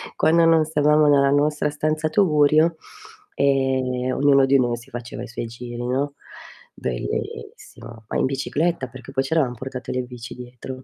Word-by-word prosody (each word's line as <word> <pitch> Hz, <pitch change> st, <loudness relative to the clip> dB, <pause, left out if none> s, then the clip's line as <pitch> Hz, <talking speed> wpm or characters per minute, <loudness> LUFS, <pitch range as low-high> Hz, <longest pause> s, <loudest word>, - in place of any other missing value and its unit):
quando 165 Hz, +1 st, +4 dB
non 165 Hz, -1 st, +5 dB
stavamo 150 Hz, 0 st, +3 dB
nella 140 Hz, -1 st, +4 dB
nostra 150 Hz, +1 st, +1 dB
stanza 155 Hz, +1 st, -1 dB
tugurio, 155 Hz, -3 st, +3 dB, 0.6 s
ehm, 130 Hz, -2 st, 0 dB
ognuno 140 Hz, -1 st, +4 dB
di 135 Hz, 0 st, +4 dB
noi 120 Hz, -1 st, 0 dB
si 125 Hz, +3 st, -14 dB
faceva 120 Hz, 0 st, -7 dB
i -, -, -7 dB
suoi 120 Hz, -1 st, -5 dB
giri, 120 Hz, +1 st, -7 dB
no, 140 Hz, +3 st, -1 dB, 0.6 s
bellissimo, 110 Hz, -, -6 dB
ma -, -, -2 dB
in -, -, +2 dB
bicicletta, 140 Hz, +2 st, -1 dB
perché 130 Hz, +1 st, -12 dB
poi 135 Hz, 0 st, 0 dB
ci 135 Hz, -, -3 dB
eravam 130 Hz, -7 st, +1 dB
portate 130 Hz, +1 st, -6 dB
le 125 Hz, -, -1 dB
bici 120 Hz, -2 st, -9 dB
dietro, 125 Hz, +1 st, -9 dB
135 Hz, 160 wpm, -22 LUFS, 125-150 Hz, 0.6 s, non